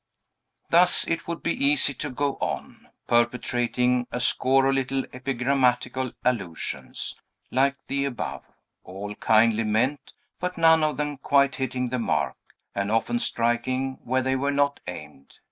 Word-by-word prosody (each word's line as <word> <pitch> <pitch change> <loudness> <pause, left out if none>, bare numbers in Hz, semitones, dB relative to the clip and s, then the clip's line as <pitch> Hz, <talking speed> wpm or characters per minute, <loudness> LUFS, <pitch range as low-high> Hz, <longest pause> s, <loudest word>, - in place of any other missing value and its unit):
Thus 175 +2 +5
it 165 -1 -2
would 170 0 -5
be 170 - +1
easy 140 0 +3
to - - -5
go 140 +2 -1
on, - - -5 0.2
perpetrating 120 +1 +1
a 125 - -2
score 135 +2 +3
of 135 - +3
little 135 0 -1
epigrammatical 130 -1 0
allusions, 95 -10 -3 0.3
like 135 +2 +2
the 140 0 -1
above, 130 -4 -4 0.4
all 100 +3 -7
kindly 110 +1 +3
meant, 120 +7 0 0.3
but 180 0 -3
none 160 -1 +5
of 150 -3 0
them 145 -1 -2
quite 140 0 +2
hitting 130 -1 -2
the 125 +1 -2
mark, 110 -7 0 0.4
and 100 0 -2
often 115 - +1
striking 130 - -1
where 130 +1 0
they 130 +1 +1
were 140 +2 0
not 140 0 +1
aimed. 75 -5 -9
130 Hz, 145 wpm, -25 LUFS, 120-140 Hz, 0.4 s, Thus